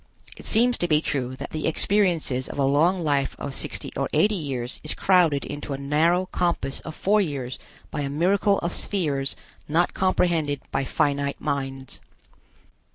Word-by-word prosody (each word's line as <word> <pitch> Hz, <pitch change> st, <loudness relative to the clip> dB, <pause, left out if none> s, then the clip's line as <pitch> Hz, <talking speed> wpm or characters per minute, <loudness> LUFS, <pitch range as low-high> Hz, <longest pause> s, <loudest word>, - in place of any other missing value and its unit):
It -, -, -9 dB
seems 240 Hz, +2 st, +4 dB
to 175 Hz, -, +1 dB
be 155 Hz, -2 st, +4 dB
true 130 Hz, -4 st, -2 dB
that -, -, -7 dB
the 155 Hz, -, -2 dB
experiences 165 Hz, -7 st, +1 dB
of -, -, -7 dB
a 140 Hz, -, +2 dB
long 165 Hz, +7 st, +3 dB
life 140 Hz, -3 st, 0 dB
of 140 Hz, -, -5 dB
sixty -, -, -3 dB
or -, -, -1 dB
eighty 210 Hz, +1 st, +4 dB
years 135 Hz, -9 st, -3 dB
is 155 Hz, -, -2 dB
crowded 175 Hz, -7 st, +3 dB
into 145 Hz, 0 st, -5 dB
a -, -, -3 dB
narrow 160 Hz, +6 st, +2 dB
compass 170 Hz, -7 st, -1 dB
of 160 Hz, -, -8 dB
four 210 Hz, +2 st, +3 dB
years 135 Hz, -8 st, -3 dB, 0.3 s
by 150 Hz, -, -3 dB
a 140 Hz, -, -2 dB
miracle 195 Hz, +7 st, +2 dB
of 170 Hz, -, -1 dB
spheres 145 Hz, -9 st, -1 dB, 0.3 s
not 165 Hz, +4 st, +2 dB
comprehended 170 Hz, -6 st, +1 dB
by 135 Hz, -, 0 dB
finite 140 Hz, +1 st, 0 dB
minds. 135 Hz, -1 st, -4 dB
150 Hz, 165 wpm, -24 LUFS, 140-180 Hz, 0.3 s, seems